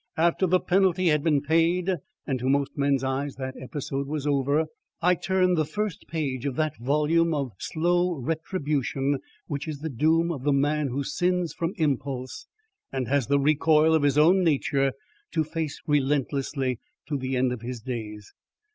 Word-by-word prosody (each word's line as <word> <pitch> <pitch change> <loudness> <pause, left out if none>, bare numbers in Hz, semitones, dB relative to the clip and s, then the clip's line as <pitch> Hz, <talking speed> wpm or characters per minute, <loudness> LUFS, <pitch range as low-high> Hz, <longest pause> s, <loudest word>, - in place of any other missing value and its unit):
After 170 +3 +2
the 185 +1 +4
penalty 185 -1 +2
had 150 -2 +2
been 150 -4 +2
paid 170 +4 +2 0.3
and 135 -3 -1
to 130 +2 -1
most 140 0 +1
men's 140 -2 +1
eyes 135 +1 -2
that 130 0 -5
episode 135 0 -4
was 150 -1 -3
over, 145 +2 +2 0.3
I 180 +2 +4
turned 180 0 +1
the - - +3
first 210 +3 -4
page 145 -5 -2
of 135 - -3
that 155 +1 0
volume 150 +6 +2
of 140 -4 -2
slow 175 +2 +1
retribution 145 -2 -1 0.3
which 145 +1 -4
is 150 -3 -5
the 160 -1 -3
doom 160 +6 +2
of 145 -6 -4
the 145 +1 +2
man 145 +1 +1
who 135 +2 -2
sins 180 +1 0
from 170 +2 -2
impulse, 135 -4 -2 0.4
and 130 -2 -2
has 140 -3 +1
the 140 +1 +3
recoil 155 +2 +4
of 160 - +4
his 145 -1 +2
own 180 +5 +5
nature 140 -4 +1 0.4
to 160 -1 +2
face 155 -1 -4
relentlessly 140 -2 0 0.3
to 150 - -2
the 130 -1 -2
end 125 0 +2
of 120 - -7
his 120 0 -5
days. 110 -3 -6
145 Hz, 175 wpm, -26 LUFS, 135-165 Hz, 0.4 s, own